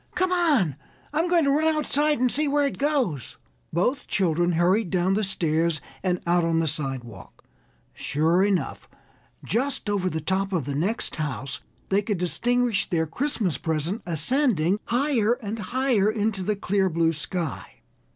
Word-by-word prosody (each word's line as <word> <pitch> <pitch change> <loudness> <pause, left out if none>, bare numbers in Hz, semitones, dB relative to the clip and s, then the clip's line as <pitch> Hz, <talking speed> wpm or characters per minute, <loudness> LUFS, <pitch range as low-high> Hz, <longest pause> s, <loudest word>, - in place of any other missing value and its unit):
Come 370 0 +1
on. 290 - +2 0.4
I'm 325 +3 +1
going 345 -2 +4
to 280 - +3
run 315 +2 +2
outside 300 -1 +1
and 250 -1 +2
see 300 +2 +2
where 290 0 +2
it 280 - -3
goes." 270 - -1 0.3
Both 245 - 0
children 175 -2 +1
hurried 180 +4 +2
down 190 +3 +1
stairs 165 -4 +1 0.2
and 180 -2 0
out 175 0 +2
on 165 0 +1
the 165 - +1
sidewalk. 135 - -5 0.5
Sure 165 +5 +1
enough, 190 -8 -1 0.5
just 245 -2 -1
over 190 -2 0
the 160 - -3
top 190 +4 -1
of 165 -7 0
the 140 - -3
next 185 +10 -1
house 140 -3 -4 0.3
they 195 +1 +3
could 205 -1 -2
distinguish 240 +5 0
their 160 -2 +1
Christmas 200 - -1
present 160 +6 -2
ascending 195 - +2
higher 240 -3 +2
and 225 -3 -5
higher 235 0 +1
into 215 -2 -1
the 210 +3 0
clear 195 -1 0
blue 165 -1 +1
sky. 165 0 -5
195 Hz, 155 wpm, -25 LUFS, 165-245 Hz, 0.5 s, going